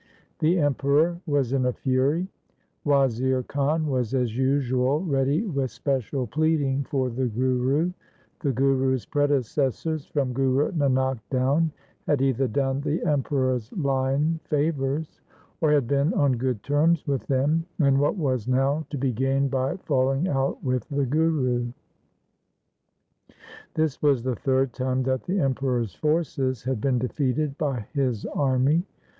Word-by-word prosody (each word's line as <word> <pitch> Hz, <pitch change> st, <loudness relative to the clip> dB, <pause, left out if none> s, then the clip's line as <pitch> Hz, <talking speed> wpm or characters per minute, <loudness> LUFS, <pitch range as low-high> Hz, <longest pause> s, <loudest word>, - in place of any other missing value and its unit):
The 165 Hz, +4 st, +3 dB
Emperor 145 Hz, +3 st, +2 dB
was 140 Hz, -4 st, +1 dB
in 130 Hz, -2 st, +2 dB
a 125 Hz, -, 0 dB
fury. 140 Hz, +8 st, 0 dB, 0.6 s
Wazir 130 Hz, -2 st, +2 dB
Khan 145 Hz, +4 st, 0 dB
was 130 Hz, -4 st, -1 dB
as 125 Hz, -4 st, 0 dB
usual 130 Hz, +1 st, +1 dB
ready 140 Hz, 0 st, +1 dB
with 140 Hz, -, -1 dB
special 130 Hz, 0 st, -2 dB
pleading 140 Hz, +1 st, 0 dB
for 130 Hz, -4 st, -1 dB
the 125 Hz, +2 st, -1 dB
Guru: 130 Hz, +7 st, +1 dB, 0.2 s
' -, -, -36 dB
The 140 Hz, -, +1 dB
Guru's 130 Hz, 0 st, +1 dB
predecessors, 145 Hz, +1 st, 0 dB
from 135 Hz, -4 st, -1 dB
Guru 135 Hz, +2 st, +1 dB
Nanak 130 Hz, -5 st, +1 dB
down, 140 Hz, +5 st, +1 dB, 0.4 s
had 145 Hz, -, +2 dB
either 135 Hz, -1 st, +1 dB
done 135 Hz, +3 st, -1 dB
the 150 Hz, +2 st, -1 dB
Emperor's 130 Hz, -5 st, 0 dB
line 140 Hz, +1 st, 0 dB
favours, 150 Hz, 0 st, -1 dB, 0.4 s
or 155 Hz, -2 st, +3 dB
had 145 Hz, -4 st, +3 dB
been 140 Hz, +5 st, +1 dB
on 140 Hz, -2 st, +3 dB
good 120 Hz, -3 st, -2 dB
terms 155 Hz, +3 st, +2 dB
with 140 Hz, -3 st, -2 dB
them, 150 Hz, +5 st, +1 dB
and 140 Hz, -3 st, +4 dB
what 145 Hz, +6 st, +2 dB
was 130 Hz, -, -1 dB
now 135 Hz, +4 st, +1 dB
to 145 Hz, -, -4 dB
be 130 Hz, -1 st, 0 dB
gained 135 Hz, +3 st, +1 dB
by 135 Hz, +3 st, -1 dB
falling 135 Hz, -1 st, 0 dB
out 135 Hz, -4 st, -1 dB
with 125 Hz, -3 st, -1 dB
the 140 Hz, -1 st, 0 dB
Guru? 130 Hz, -4 st, +1 dB, 2.1 s
This 155 Hz, -3 st, 0 dB
was 140 Hz, -5 st, +3 dB
the 130 Hz, -1 st, -1 dB
third 130 Hz, +1 st, 0 dB
time 130 Hz, +1 st, -1 dB
that 130 Hz, 0 st, -1 dB
the 190 Hz, +2 st, 0 dB
Emperor's 130 Hz, -, 0 dB
forces 140 Hz, -6 st, -1 dB
had 130 Hz, -3 st, -2 dB
been 130 Hz, -1 st, +1 dB
defeated 135 Hz, +3 st, -1 dB
by 135 Hz, -8 st, -1 dB
his 130 Hz, -7 st, -1 dB
army. 135 Hz, +3 st, +2 dB
135 Hz, 140 wpm, -25 LUFS, 130-145 Hz, 2.1 s, and